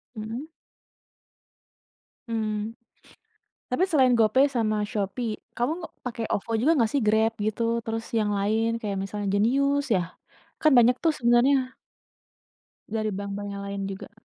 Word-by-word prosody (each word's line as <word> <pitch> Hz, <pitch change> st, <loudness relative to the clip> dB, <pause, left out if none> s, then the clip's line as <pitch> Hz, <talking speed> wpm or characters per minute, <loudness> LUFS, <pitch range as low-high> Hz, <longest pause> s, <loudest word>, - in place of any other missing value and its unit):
Mhm. 225 Hz, +7 st, -5 dB, 1.8 s
Mmm, 220 Hz, 0 st, -2 dB, 0.9 s
tapi 250 Hz, +8 st, +1 dB
selain 260 Hz, -6 st, +4 dB
GoPay 230 Hz, +5 st, +5 dB
sama 215 Hz, -3 st, 0 dB
Shopee 215 Hz, +2 st, -3 dB
kamu 240 Hz, +5 st, +1 dB, 0.3 s
pakai 230 Hz, -2 st, -3 dB
OVO 205 Hz, -, -2 dB
juga 300 Hz, +7 st, +4 dB
nggak 230 Hz, -3 st, +2 dB
sih 280 Hz, -, +1 dB
Grab 220 Hz, +1 st, +3 dB
gitu, 215 Hz, +2 st, -1 dB, 0.2 s
terus 225 Hz, 0 st, -3 dB
yang 210 Hz, -1 st, +1 dB
lain 220 Hz, +3 st, +1 dB
kayak 205 Hz, -3 st, -3 dB
misalnya 205 Hz, +1 st, -4 dB
Jenius 275 Hz, +7 st, +2 dB
ya? 185 Hz, -, +3 dB, 0.6 s
Kan 310 Hz, -, +5 dB
banyak 245 Hz, +1 st, +5 dB
tuh 325 Hz, -, +3 dB
sebenarnya 255 Hz, +2 st, +3 dB, 1.1 s
dari 215 Hz, 0 st, -1 dB
bank 200 Hz, 0 st, -4 dB
bank 205 Hz, 0 st, -5 dB
yang 200 Hz, 0 st, -6 dB
lain 200 Hz, 0 st, -4 dB
juga. 195 Hz, 0 st, -7 dB
225 Hz, 135 wpm, -26 LUFS, 210-250 Hz, 1.8 s, GoPay